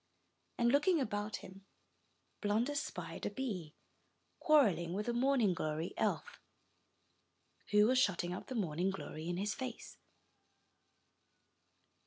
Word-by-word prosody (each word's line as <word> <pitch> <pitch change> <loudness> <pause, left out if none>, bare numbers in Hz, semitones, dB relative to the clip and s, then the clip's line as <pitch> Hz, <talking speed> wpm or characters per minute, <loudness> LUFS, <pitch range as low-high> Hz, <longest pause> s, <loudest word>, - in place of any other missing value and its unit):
And 235 0 +3
looking 310 +5 +4
about 210 -4 -2
him, 190 +1 -12 0.8
Blunder 225 +7 +1
spied 285 - -4
a - - -1
bee, 190 - -4 0.6
quarreling 205 - +4
with 210 +3 -2
a 240 - +1
morning 245 -5 +3
glory 155 +1 -3
elf, - - -1 1.3
who 210 0 +6
was 255 +3 +4
shutting 180 -6 +1
up 180 - -7
the 260 - -5
morning 180 -3 0
glory 165 -4 -5
in 175 - -1
his 205 +3 -1
face. 255 -2 -7
210 Hz, 120 wpm, -35 LUFS, 180-255 Hz, 1.3 s, who